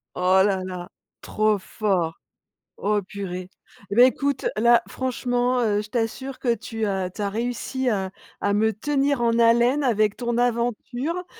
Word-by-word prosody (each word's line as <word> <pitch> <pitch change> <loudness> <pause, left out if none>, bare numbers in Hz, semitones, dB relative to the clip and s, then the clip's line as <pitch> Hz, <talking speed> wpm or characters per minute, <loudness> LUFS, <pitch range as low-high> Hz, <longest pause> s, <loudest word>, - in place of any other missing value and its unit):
Oh 185 +1 +4
là 195 -2 +1
là, 180 0 -6 0.3
trop 215 0 +1
fort. 185 -4 -1 0.6
Oh 205 0 +1
purée 185 -2 -6 0.4
et 200 - -3
beh, 245 - +8
écoute, 280 +1 0
là, 235 +2 +4
franchement, 250 -1 -1
heu, 210 -3 +1
je 210 - -11
t'assure 255 +3 -3
que 240 -3 +1
tu 225 -1 -4
as 190 -3 -1
tu 205 +3 -6
as 200 - 0
réussi 245 +3 -2
à 190 -4 -1 0.3
à 200 - 0
me 220 +2 +3
tenir 275 +4 0
en 230 0 +2
haleine 240 +5 +4
avec 215 -5 +2
ton 240 -1 -2
aventure, 245 +7 -1
230 Hz, 160 wpm, -24 LUFS, 200-245 Hz, 0.6 s, beh